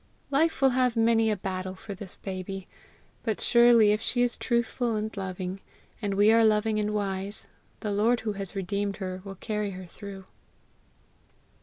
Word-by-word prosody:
Life 310 +1 +2
will 265 - +6
have 250 -1 +2
many 225 -1 +3
a 215 - +2
battle 185 -1 -4
for 200 +2 -8
this 195 -1 -8
baby; 190 0 -5 0.6
but 220 -3 -2
surely 235 -3 +6
if 210 +1 +1
she 245 +2 +1
is 245 -1 +1
truthful 235 -1 0
and 215 +1 -3
loving, 185 -1 -4 0.4
and 200 -2 -1
we 205 +2 +5
are 230 0 +5
loving 215 0 +3
and 210 0 0
wise, 200 -1 -3 0.3
the 210 - -2
Lord 225 +4 +2
who 215 -2 -2
has 195 -1 -6
redeemed 200 +1 -2
her 185 -2 -5
will 195 -1 -8
carry 210 +1 -2
her 185 - -8
through. 195 +1 -9
210 Hz, 170 wpm, -28 LUFS, 195-225 Hz, 0.6 s, will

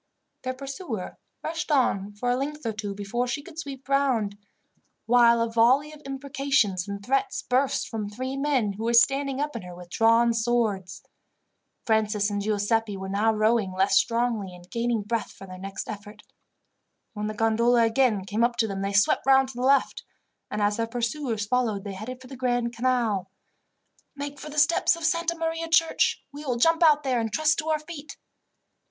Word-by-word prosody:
Their 255 0 -3
pursuer 270 - -6 0.2
rushed 325 0 -3
on 205 -8 +1
for 245 +4 -1
a - - +2
length 290 +2 -4
or 225 - -1
two 205 -2 -5
before 205 +5 -2
she 285 +4 -3
could 320 -1 -10
sweep 275 -4 -7
round, 260 -7 +1 0.7
while 235 0 +5
a - - -1
volley 255 +6 +3
of 300 - -13
imprecations 270 -8 0
and 200 0 -6
threats 275 - 0
burst 260 +2 +1
from 215 -3 -4
three 255 +5 -4
men 275 -7 0
who 215 +3 -5
were 235 +1 +2
standing 275 +2 +3
up 295 -2 -2
in 230 - -4
her 180 -1 -10
with 175 0 -12
drawn 230 +1 +4
swords. 220 -6 -1 0.8
Francis 215 -2 +1
and 205 0 -1
Giuseppi 210 0 0
were 190 0 -6
now 210 +3 +2
rowing 215 -2 +1
less 190 +1 +2
strongly, 230 -5 +1
and 180 0 -16
gaining 235 -2 -1
breath 225 +1 -2
for 195 - -12
their 185 -1 -10
next 195 +1 -6
effort. 210 0 -9 0.9
When 210 -1 -3
the 215 - -4
gondola 230 +2 +3
again 225 -4 +2
came 210 +4 0
up 240 0 +2
to 235 -2 +1
them 195 -2 -4
they 195 +1 -2
swept 200 +6 +3
round 265 -1 +5
to 265 - -10
the 245 - -5
left, 275 +2 +2 0.5
and 210 - -2
as 205 0 +1
their 230 0 -1
pursuers 235 -1 -2
followed 220 -3 0
they 200 -2 -6
headed 230 +6 -7
for - - -12
the 265 - -9
Grand 245 -2 -1
Canal. 230 -6 0 0.9
"Make 285 0 -6
for 305 - -8
the 300 - -9
steps 330 +3 +4
of 335 -1 -5
Santa 335 0 +1
Maria 330 0 -2
church. 325 0 +2
We 290 +1 -9
will 250 -5 -1
jump 330 +7 +3
out 300 -3 +5
there 255 -3 +1
and 225 -1 -2
trust 310 +5 +2
to 320 0 -3
our 310 - +2
feet." 305 -2 -10
235 Hz, 190 wpm, -26 LUFS, 210-275 Hz, 0.9 s, while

